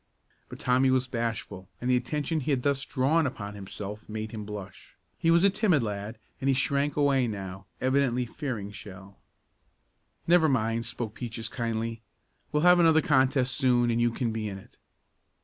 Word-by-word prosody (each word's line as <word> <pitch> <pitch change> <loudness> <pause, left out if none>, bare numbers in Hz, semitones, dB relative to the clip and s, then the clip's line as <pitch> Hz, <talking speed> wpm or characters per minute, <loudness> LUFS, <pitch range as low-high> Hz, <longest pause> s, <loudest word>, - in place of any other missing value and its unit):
But - - -8
Tommy 130 +1 +3
was 130 0 +2
bashful, 115 -6 -4
and 125 - -4
the 125 - +4
attention 150 +5 -1
he 150 - -4
had 130 -4 +1
thus 140 -1 +1
drawn 145 +4 +2
upon 105 -5 -6
himself 105 +1 -7
made 110 0 -4
him 110 -2 -6
blush. 105 -2 -9 0.2
He 165 - +2
was 170 +1 +5
a 200 - +5
timid 185 - +2
lad 105 +1 -4 0.2
and 135 - -2
he 135 - +4
shrank 140 +2 0
away 140 -3 +3
now, 95 -3 -6
evidently 130 -2 +1
fearing 115 -5 -5
Shell. 100 -1 -11 1.1
"Never 170 -2 +5
mind," 115 -3 0
spoke 110 -3 -4
Peaches 115 -2 -5
kindly, 115 -1 -3 0.5
"we'll 150 +1 +1
have 180 0 +7
another 160 -2 +5
contest 130 -2 +2
soon 125 -3 +3
and 115 +1 +1
you 120 - +4
can 115 0 -2
be 110 -1 -3
in 95 - -6
it." 95 - -16
125 Hz, 175 wpm, -28 LUFS, 110-140 Hz, 1.1 s, have